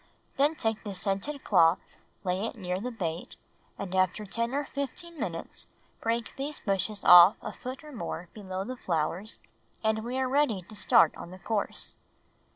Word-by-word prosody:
Then 290 Hz, +3 st, +3 dB
take 225 Hz, -6 st, -1 dB
the 205 Hz, -3 st, -5 dB
scented 200 Hz, +10 st, -2 dB
cloth, 170 Hz, -3 st, +5 dB, 0.5 s
lay 185 Hz, +1 st, 0 dB
it -, -, -7 dB
near 185 Hz, -4 st, -3 dB
the 250 Hz, -, -2 dB
bait, 175 Hz, -8 st, -4 dB, 0.4 s
and 190 Hz, -2 st, -5 dB
after 185 Hz, +3 st, +1 dB
ten 230 Hz, +4 st, -1 dB
or 290 Hz, 0 st, 0 dB
fifteen 295 Hz, +5 st, -5 dB
minutes -, -, -5 dB, 0.3 s
break 230 Hz, 0 st, -1 dB
these 285 Hz, +2 st, -4 dB
bushes 200 Hz, +1 st, -2 dB
off 180 Hz, +3 st, +10 dB
a -, -, -6 dB
foot 255 Hz, +4 st, -7 dB
or 300 Hz, -, -10 dB
more 195 Hz, -8 st, -5 dB
below 190 Hz, -3 st, -5 dB
the 255 Hz, +5 st, -5 dB
flowers 175 Hz, +3 st, -2 dB, 0.4 s
and 220 Hz, 0 st, +1 dB
we 245 Hz, +2 st, -3 dB
are 260 Hz, 0 st, +1 dB
ready 255 Hz, -8 st, +2 dB
to 215 Hz, -, -13 dB
start 165 Hz, -5 st, +5 dB
on -, -, -9 dB
the 185 Hz, -, -10 dB
course. 205 Hz, +2 st, -3 dB
215 Hz, 170 wpm, -29 LUFS, 185-255 Hz, 0.5 s, off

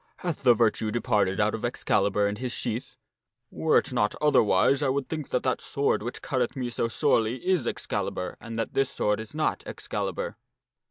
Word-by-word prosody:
Hath 170 Hz, -4 st, -2 dB
the 125 Hz, -3 st, +6 dB
virtue 110 Hz, -1 st, +2 dB
departed 105 Hz, -4 st, +1 dB
out 105 Hz, +1 st, +2 dB
of 110 Hz, -, -4 dB
Ex 120 Hz, -, -3 dB
calibur 100 Hz, +1 st, +2 dB
and 105 Hz, +1 st, -3 dB
his 125 Hz, -1 st, -3 dB
sheath? 120 Hz, +2 st, -3 dB, 0.6 s
Were 160 Hz, -, +2 dB
it -, -, 0 dB
not 105 Hz, -4 st, +1 dB
otherwise 140 Hz, -2 st, +4 dB
I 140 Hz, -, +2 dB
would 135 Hz, 0 st, -1 dB
think 155 Hz, -3 st, -5 dB
that 125 Hz, -, 0 dB
that 130 Hz, -, 0 dB
sword 140 Hz, -5 st, 0 dB
which 120 Hz, +3 st, -5 dB
cutteth 130 Hz, -1 st, -1 dB
me 125 Hz, -2 st, -3 dB
so 115 Hz, -, 0 dB
sorely 115 Hz, -2 st, +2 dB
is 180 Hz, -10 st, +2 dB
Excalibur 90 Hz, -, -3 dB
and 115 Hz, 0 st, -7 dB
that 115 Hz, -, -2 dB
this 135 Hz, -1 st, +2 dB
sword 105 Hz, 0 st, 0 dB
is 110 Hz, +6 st, -8 dB
not 155 Hz, -, 0 dB
Excalibur." -, -, -4 dB
120 Hz, 195 wpm, -27 LUFS, 110-140 Hz, 0.6 s, the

